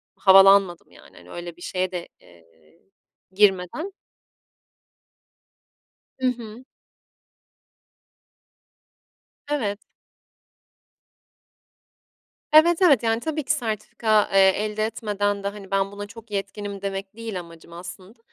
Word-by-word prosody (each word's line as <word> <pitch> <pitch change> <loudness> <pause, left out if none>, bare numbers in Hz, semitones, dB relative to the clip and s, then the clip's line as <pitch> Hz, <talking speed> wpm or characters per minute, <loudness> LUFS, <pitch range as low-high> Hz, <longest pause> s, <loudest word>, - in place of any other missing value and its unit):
havalanmadım, 195 -2 +5
yani, - - -17
öyle 175 -1 -7
bir - - -18
şeye 185 +1 -2
de, 175 -2 -5
eee, 80 -2 -24 0.5
girmeden 200 - +1 2.3
I - - +2
hı. 240 -1 -4 2.8
Evet. 220 -9 -1 2.7
Evet, 325 +2 +6
evet. 285 -10 +5
Yani, 225 0 0
tabii 310 +1 -3
ki 285 - +1
sertifika, 220 -4 0
eee, 195 0 +6 0.2
elde 215 0 -2
etmeden 205 -2 -2
de, - - 0
hani, 200 -2 -10
"Ben, 195 0 0
buna 205 0 -7
çok 225 +1 -14
yetkinim." 200 0 -5
demek 195 0 -5
değil 225 -5 -5
amacım 170 -1 -14
aslında. 185 +5 -11
200 Hz, 100 wpm, -23 LUFS, 190-225 Hz, 2.8 s, Evet